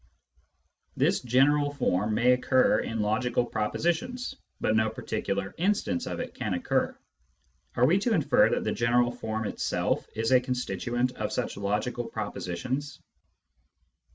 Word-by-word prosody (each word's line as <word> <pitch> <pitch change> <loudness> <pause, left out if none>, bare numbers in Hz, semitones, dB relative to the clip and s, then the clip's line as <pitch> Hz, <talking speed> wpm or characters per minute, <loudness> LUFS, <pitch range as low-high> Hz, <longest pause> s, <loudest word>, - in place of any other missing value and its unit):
This - - +3
general 145 +4 +2
form 105 -5 +1
may 120 +3 +4
occur 125 +1 +3
in 115 -1 -2
logical 120 +3 +1
propositions, 175 - -2 0.3
but 110 - +1
no 110 0 +3
particular 100 -3 -3
instance 210 +7 0
of - - -4
it 250 0 -5
can 105 -7 -2
occur. 90 - 0 0.8
Are 125 - +4
we 175 +9 +4
to 225 +2 +1
infer 140 - +4
that - - 0
the - - -1
general 120 +1 +2
form 110 -2 -4
itself - - -1
is 115 +2 -1
a 130 -1 +6
constituent 125 0 -1
of - - -2
such - - -2
logical 105 +5 -2
propositions 115 +7 -4
125 Hz, 135 wpm, -28 LUFS, 110-145 Hz, 0.8 s, a